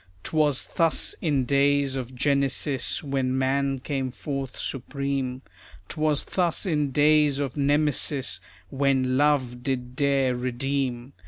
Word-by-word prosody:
'Twas 150 -4 +1
thus 165 -3 +2
in 145 -6 +1
days 140 0 +2
of 130 -1 -5
Genesis, 140 +1 +1
When 135 -2 -1
man 135 +1 +1
came 130 0 -3
forth 135 0 -5
supreme. 135 -1 -3 0.5
'Twas 155 -2 0
thus 175 -1 0
in 150 -5 0
days 150 0 +4
of 140 -3 -3
Nemesis, 145 - +1 0.3
When 135 -2 +1
Love 130 -4 +1
did 125 -1 -3
dare 135 -2 +2
redeem. 125 0 -2
140 Hz, 115 wpm, -25 LUFS, 130-145 Hz, 0.5 s, days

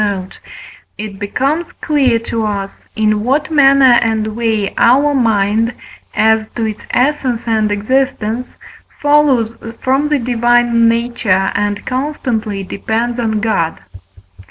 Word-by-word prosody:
note), 195 -3 -3 0.6
it 205 -2 -7
becomes 275 +11 -2
clear 270 -6 +1
to 230 0 -3
us, 200 -2 -4
in 215 -1 +1
what 280 +6 0
manner 275 -4 +5
and 220 -1 -1
way 225 -3 -1
our 275 +5 +4
mind, 225 -2 +1 0.4
as 220 0 +3
to 230 - -1
its 215 -1 -5
essence 255 -3 0
and 220 -2 +1
existence, 240 +1 -1 0.4
follows 285 -6 +2 0.2
from 270 +3 +1
the 300 - +2
divine 240 -1 +2
nature 230 -5 0
and 205 0 -2
constantly 250 -7 -3
depends 225 +5 -3
on 220 -2 0
God. 190 -7 -1
230 Hz, 120 wpm, -15 LUFS, 215-260 Hz, 0.6 s, manner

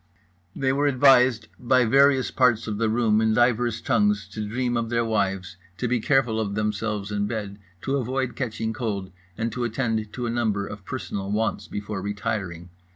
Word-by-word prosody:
They 130 -1 +1
were 145 +1 +2
advised 130 -4 +4
by 125 0 +3
various 135 +2 +4
parts 120 -3 +3
of 105 -2 -4
the 115 -1 +2
room 110 -1 +2
in 110 -1 +2
divers 120 -1 +2
tongues 210 0 +1
to 110 - -5
dream 120 +3 -1
of 115 -1 -1
their 115 0 +1
wives, 95 -4 -1 0.2
to 125 - -1
be 120 0 +1
careful 120 -2 +2
of 100 -2 -2
themselves 105 -1 -2
in 105 0 -1
bed, 105 -3 -5 0.2
to 135 +1 0
avoid 130 0 -2
catching 110 -3 -3
cold, 100 -6 -3 0.3
and 115 +1 -1
to 125 - -3
attend 115 -3 -1
to 125 +1 -4
a 115 - -1
number 110 -4 0
of 100 -1 -9
personal 100 -6 -4
wants 110 +2 -1
before 105 -1 -5
retiring. 95 -4 -4
110 Hz, 180 wpm, -25 LUFS, 105-125 Hz, 0.3 s, advised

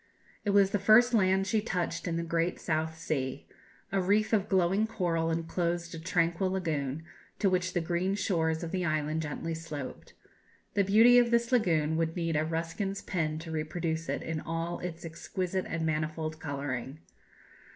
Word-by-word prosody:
It 205 - -1
was 200 -1 +5
the 205 - +1
first 220 +5 +6
land 190 -3 +3
she 210 +2 +1
touched 180 -4 -2
in 165 -1 -1
the 170 - -1
great 170 +1 0
South 160 0 -1
Sea. 140 -5 -3 0.5
A 195 - +1
reef 210 +4 +2
of 205 -3 +2
glowing 190 +3 +3
coral 170 -7 0
enclosed 170 +1 -1
a 165 - -6
tranquil 170 +2 +1
lagoon, 160 -6 -2 0.3
to 195 - +2
which 185 0 0
the 175 - +1
green 175 +3 0
shores 165 -5 0
of 165 - -4
the 185 -1 -1
island 155 -1 0
gently 160 +2 -4
sloped. 155 -5 -7 0.6
The 200 - +3
beauty 225 +5 +7
of 240 -1 +3
this 235 +1 +2
lagoon 160 -10 +2
would 165 0 0
need 165 -2 -1
a 150 - +2
Ruskin's 165 +5 -3
pen 155 -4 -1
to 165 - -6
reproduce 160 +1 -2
it - - -2
in 160 -1 -3
all 165 +2 -3
its 170 -1 -6
exquisite 180 +3 -3
and 165 -1 -2
manifold 155 0 -2
colouring. 140 -2 -4
170 Hz, 170 wpm, -30 LUFS, 160-190 Hz, 0.6 s, beauty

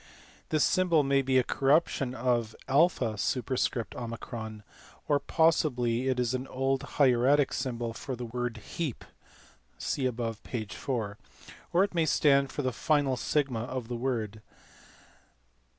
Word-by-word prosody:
This 155 -1 +2
symbol 170 -5 +3
may 140 0 +3
be 130 -1 +2
a 130 - +5
corruption 135 -1 +1
of 120 -3 0
OP, 145 +3 +3
or 115 +2 -3
possibly 130 -7 +2
is 125 -2 +1
an 130 +1 -3
old 135 +1 0
hieratic 135 +1 +3
symbol 120 -3 -3
for 130 +3 -5
the 120 0 -6
word 120 0 -3
heap 140 +4 -5 0.7
(see 130 -2 -1
above, 115 -3 -3
p. 115 -3 -4
4), 105 -1 -4 0.5
or 180 +3 +4
it 200 - -2
may 165 -2 +1
stand 140 -2 +3
for 145 - -3
the 130 -1 0
final 145 -2 +1
sigma 135 -1 0
of 125 0 -5
the 120 - -2
word. 115 -4 -2
130 Hz, 130 wpm, -29 LUFS, 115-140 Hz, 0.7 s, a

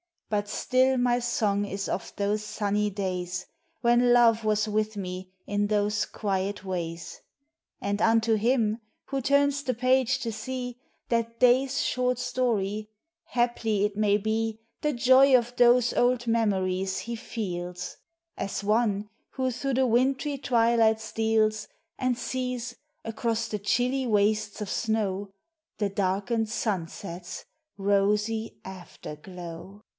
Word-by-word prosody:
But 205 -1 0
still 260 +4 +2
my 245 0 +2
song 210 -4 0
is 195 0 -4
of 185 - -3
those 205 +1 0
sunny 210 0 -1
days 185 -2 -3 0.4
When 240 0 +4
Love 230 -2 +5
was 215 0 +2
with 215 0 -1
me 185 -1 -5 0.2
in 205 0 0
those 210 0 +1
quiet 195 -1 -2
ways. 170 -3 -5 0.6
And 200 +1 -1
unto 225 0 +4
him 225 0 +1 0.3
who 275 -1 -2
turns 280 +1 +3
the 260 -3 -1
page 255 +1 +2
to 230 - -2
see 245 +2 -5 0.3
That 230 0 -1
day's 255 +2 +4
short 250 -1 0
story, 215 -5 -1 0.4
haply 235 -4 0
it 210 -1 -3
may 205 -1 +3
be, 220 +1 -2 0.2
The 300 0 +1
joy 260 +2 +6
of 240 0 -3
those 240 0 +5
old 245 0 +2
memories 190 -5 0
he 235 0 -5
feels: 180 -6 -5 0.4
As 200 - -3
one 210 -1 +1 0.2
who 260 -1 -1
through 270 +2 -2
the 260 +1 +3
wintry 265 +4 +1
twilight 230 -3 +3
steals, 220 -1 +1 0.3
And 255 -2 +1
sees, 250 -1 -3 0.3
across 225 0 -2
the 210 - -3
chilly 250 +6 +1
wastes 210 -1 +1
of 205 - -4
snow, 205 -3 -1 0.5
The 205 -2 0
darkened 200 +4 0
sunset's 180 -4 -4 0.3
rosy 210 +3 +1
afterglow. 180 +1 -9
220 Hz, 130 wpm, -27 LUFS, 200-245 Hz, 0.6 s, joy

